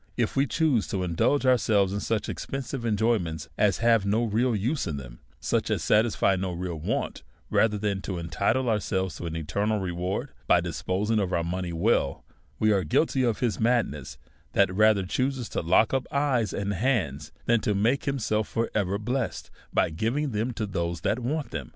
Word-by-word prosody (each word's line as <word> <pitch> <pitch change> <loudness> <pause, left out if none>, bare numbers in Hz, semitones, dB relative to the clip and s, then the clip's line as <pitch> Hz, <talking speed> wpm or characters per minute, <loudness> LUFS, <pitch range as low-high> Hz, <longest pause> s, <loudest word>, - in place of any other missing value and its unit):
If 120 -3 0
we 140 +1 +3
choose 140 - +1
to 95 -2 -2
indulge 90 - +1
ourselves 105 -6 +3
in 100 - -1
such 105 0 -1
expensive 135 -2 -4
en 105 -2 +1
joyments 90 -9 0
as 105 -3 +2
have 115 -3 +5
no 105 +4 +1
real 115 +2 +1
use 125 +9 -1
in 75 -3 -3
them^ - - -9 0.2
such - - 0
as - - 0
satisfy 105 -2 +3
no 95 -1 -2
real 85 -2 -4
want^ 75 - -2 0.3
rather 105 -2 +3
than 100 -2 -1
to 95 -2 -4
entitle 100 +9 0
ourselves 95 -5 -1
to 85 - -5
an 80 - -4
eternal 100 +7 -1
reward, 90 0 -3 0.2
by - - +5
disposing 105 +4 -1
of 95 -3 -1
our 85 -2 +1
money 90 +1 -3
well^ 85 -5 +1 0.4
w^ 110 0 +3
are 95 -2 +1
guilty 130 - +1
of 120 -4 0
his 115 -7 0
madness^ 110 - 0 0.4
who 95 - +4
rather 105 -1 +4
chooses 130 +4 -1
to - - -2
lock 95 +8 +3
up 130 -1 0
eyes 135 -6 +1
and 100 0 -2
hands 95 - -1
than 120 -1 +3
to 105 0 0
make 115 +7 +1
himself 110 -6 0
for 115 0 -2
ever 100 -2 0
bless 120 +4 -2
ed^ - - -23 0.2
by - - +2
giving 120 - -1
them 110 +3 -1
to 110 -2 -3
those 85 -4 -3
that 110 - 0
want 135 +1 -2
them. 65 -4 -5
105 Hz, 195 wpm, -27 LUFS, 90-120 Hz, 0.4 s, have